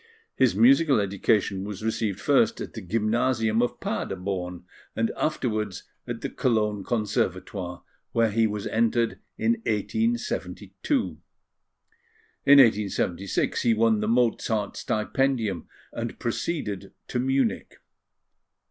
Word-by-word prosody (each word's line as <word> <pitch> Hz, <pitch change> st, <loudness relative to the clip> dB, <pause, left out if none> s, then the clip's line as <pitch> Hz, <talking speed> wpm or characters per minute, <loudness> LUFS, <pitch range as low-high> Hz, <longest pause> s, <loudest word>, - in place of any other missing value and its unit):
His -, -, +3 dB
musical 165 Hz, -, +5 dB
education 100 Hz, 0 st, +1 dB
was 105 Hz, 0 st, -6 dB
received 110 Hz, -3 st, -1 dB
first 225 Hz, +11 st, +3 dB
at -, -, -6 dB
the 110 Hz, -, -6 dB
Gymnasium 115 Hz, +3 st, +1 dB
of 120 Hz, -, -1 dB
Paderborn, 90 Hz, -2 st, -3 dB, 0.3 s
and 115 Hz, 0 st, 0 dB
afterwards 110 Hz, -, -2 dB, 0.2 s
at -, -, -5 dB
the -, -, -3 dB
Cologne 105 Hz, -4 st, 0 dB
Conservatoire, 95 Hz, -4 st, -2 dB, 0.3 s
where 115 Hz, -2 st, +2 dB
he 110 Hz, +1 st, +3 dB
was 105 Hz, -1 st, -4 dB
entered 115 Hz, +1 st, +1 dB, 0.2 s
in 230 Hz, -, +2 dB, 0.2 s
1872. 230 Hz, -, -1 dB, 1.3 s
In 145 Hz, 0 st, +9 dB
1876, 100 Hz, -6 st, +2 dB
he 115 Hz, -2 st, +3 dB
won 110 Hz, -1 st, +3 dB
the 105 Hz, -, -1 dB
Mozart 115 Hz, -3 st, +1 dB
Stipendium, 110 Hz, -3 st, -1 dB, 0.3 s
and -, -, -4 dB
proceeded 105 Hz, -, -3 dB
to 125 Hz, -, -2 dB
Munich. 135 Hz, -1 st, 0 dB
110 Hz, 110 wpm, -26 LUFS, 100-125 Hz, 1.3 s, In